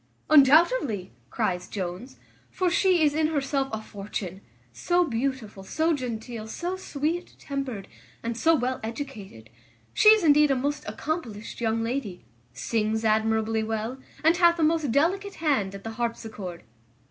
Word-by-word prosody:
"Undoubtedly," 285 - +5 0.2
cries 180 +8 -1
Jones, 190 +7 -6 0.3
"for 365 -2 0
she 360 -1 +3
is 295 -1 +3
in 310 0 +2
herself 275 -3 -1
a 220 - -3
fortune; 200 -3 -6 0.3
so 355 0 +2
beautiful, 240 -6 -3
so 320 +11 0
genteel, 235 -4 -5
so 350 +10 -3
sweet 335 0 -3
tempered, 270 -8 -5 0.4
and 230 0 -2
so 325 +8 +3
well 255 -1 -1
educated; 220 - -7 0.4
she 425 - +6
is 435 -3 +6
indeed 300 -1 +5
a 270 - +3
most 285 +3 -2
accomplished 230 -4 -5
young 225 0 0
lady; 225 - -4 0.3
sings 220 - -1
admirably 220 0 +2
well, 220 +3 -3 0.2
and 330 +2 +4
hath 345 -1 +5
a 330 - +1
most 310 -4 +2
delicate 375 - +1
hand 260 -12 0
at 195 - -10
the 225 - -5
harpsichord." 220 -6 -5
250 Hz, 145 wpm, -26 LUFS, 220-310 Hz, 0.4 s, she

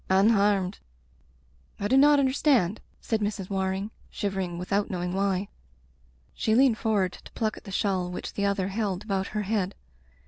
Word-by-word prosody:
— - - -28
unharmed... 200 -1 +3 0.5
.*' 65 -1 -35 0.3
*'I 205 - -1
do 260 - +4
not 290 +2 +7
understand," 260 - +2 0.2
said 225 - -1
Mrs. 205 -2 -3
Waring, 190 +2 -1 0.2
shivering 190 -4 -3
without 195 +3 -1
knowing 180 -1 -3
why. 195 0 0 0.9
She 220 - +1
leaned 250 -2 +4
forward 205 -5 +1
to - - -13
pluck 220 -2 -1
at - - -13
the 195 - -8
shawl 190 -2 0
which 180 - -6
the 200 - -1
other 195 -1 0
held 200 -2 -2
about 195 -2 -1
her 210 - 0
head. 200 -2 -1
200 Hz, 170 wpm, -27 LUFS, 190-220 Hz, 0.9 s, not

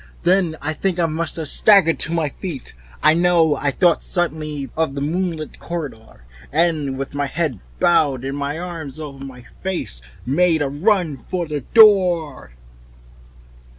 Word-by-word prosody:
Then 180 -3 +2
I 155 +2 -1
think 180 +3 -2
I 170 - +2
must 165 0 -2
have 160 -2 -4
staggered 190 -1 +5
to - - 0
my 165 -3 0
feet. 150 -3 -7 0.3
I 155 - +6
know 170 -2 +3
I 145 - -1
thought 170 +3 +2
suddenly 155 -6 -2
of 160 -4 -1
the 140 - -3
moonlit 165 0 -3
corridor, 140 - -7 0.3
and 150 -4 0
with 135 +1 -5
my 145 0 -1
head 145 - -2 0.2
bowed 140 -7 +2
and 135 +1 -3
my 145 +1 -3
arms 165 -5 -7
over 140 -3 -8
my 125 -3 -10 0.2
face, 175 - -3 0.2
made 160 +4 +2
a 140 -1 -3
stumbling 145 +4 -9
run 185 -9 +2
for 175 +8 -4
the 150 -2 -4
door. 180 - +5
160 Hz, 160 wpm, -20 LUFS, 140-175 Hz, 0.3 s, I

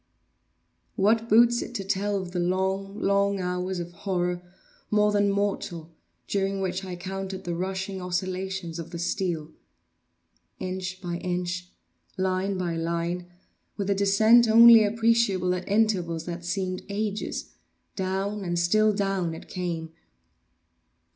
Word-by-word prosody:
What 225 +3 +2
boots 235 +2 +5
it 240 - -7
to 200 - -2
tell 200 +1 0
of 185 -2 -6
the 180 - -2
long, 190 +3 -1
long 200 0 +2
hours 180 +1 -2
of 175 0 -5
horror 180 -1 -2 0.5
more 210 0 +3
than 205 -1 +3
mortal, 195 -5 -2 0.3
during 195 0 0
which 190 0 -2
I 185 -1 -5
counted 190 +1 -5
the 175 - -3
rushing 190 +2 -3
vibrations 185 -1 -3
of 165 0 -6
the 170 - -6
steel! 170 -3 -2 1.1
Inch 185 0 -4
by 175 -2 -3
inch—line 180 - -3
by 175 -2 -2
line—with 175 +4 -4
a - - +5
descent 215 +4 +5
only 230 0 +9
appreciable 215 -4 +2
at 180 +1 -5
intervals 185 -6 +1
that 175 0 -5
seemed 185 0 -2
ages—down 200 -1 -4
and 175 -1 -2
still 215 +5 +3
down 195 -4 -1
it - - -11
came! 170 -3 -4
190 Hz, 125 wpm, -26 LUFS, 175-200 Hz, 1.1 s, only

